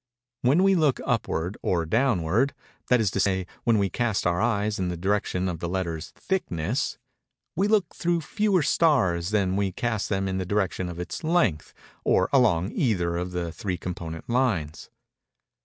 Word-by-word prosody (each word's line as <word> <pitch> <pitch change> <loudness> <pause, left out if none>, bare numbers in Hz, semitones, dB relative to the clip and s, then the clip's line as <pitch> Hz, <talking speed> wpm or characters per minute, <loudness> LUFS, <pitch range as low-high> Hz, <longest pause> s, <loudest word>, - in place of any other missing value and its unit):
When 140 +9 +4
we 195 0 +5
look 155 -7 +2
upward 105 -7 -1
or 85 -3 0
downward—that 120 - 0
is 105 -4 +1
to - - -2
say, 95 -1 +1 0.2
when 115 -2 +4
we 100 -2 +1
cast 115 -2 0
our 85 +1 +1
eyes 105 -3 0
in 90 -1 -1
the 90 - -3
direction 95 0 0
of 85 -3 -3
the 85 - -3
letter's 85 -4 -3
thickness—we 135 - -3
look 210 -5 +2
through 175 -1 0
fewer 200 -1 +1
stars 100 - +2
than 105 -3 +1
when 95 - -1
we 100 -1 0
cast 115 +1 -2
them 95 -1 0
in 95 0 -2
the 95 - -2
direction 95 -2 -1
of 85 0 -7
its 90 - -5
length, 155 - +1 0.3
or 95 - +2
along 105 -8 +3
either 90 -9 0
of 90 +1 -2
the 90 -2 -3
three 90 +2 -3
component 85 -3 -6
lines. 105 - -1
100 Hz, 170 wpm, -26 LUFS, 90-125 Hz, 0.3 s, we